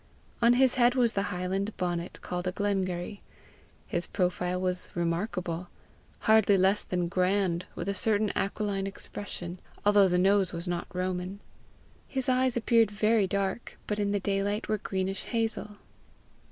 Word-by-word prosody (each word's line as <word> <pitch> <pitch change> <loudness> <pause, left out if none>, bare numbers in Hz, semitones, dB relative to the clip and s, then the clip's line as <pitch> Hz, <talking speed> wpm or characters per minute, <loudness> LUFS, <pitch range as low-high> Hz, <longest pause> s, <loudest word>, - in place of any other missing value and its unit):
On 235 +1 +6
his 255 0 +4
head 240 +1 +5
was 240 -3 +3
the 200 - +1
highland 190 +3 -2
bonnet 175 -1 -2
called 180 0 -3
a - - +1
glengarry. 195 -1 -2 0.6
His 175 0 -2
profile 180 -1 -1
was 180 0 -2
remarkable 175 0 -2 0.5
hardly 215 -2 +5
less 190 +2 +3
than 180 -1 -1
grand, 185 0 +1
with - - -5
a 200 - 0
certain 210 +1 +2
aquiline 200 -1 -1
expression, 185 -3 -5 0.3
although 205 -1 +6
the 180 -1 +2
nose 195 +1 +3
was 170 +1 -4
not 175 -1 -2
roman. 185 +1 -3 0.7
His 265 -2 -2
eyes 255 -1 +2
appeared 230 -1 +4
very 210 0 +2
dark, 195 +3 -2
but 210 0 -2
in 200 -1 +1
the 205 - +1
daylight 200 +2 -1
were 215 -1 0
greenish 190 -1 -2
hazel. 225 -3 -2
195 Hz, 150 wpm, -29 LUFS, 180-210 Hz, 0.7 s, On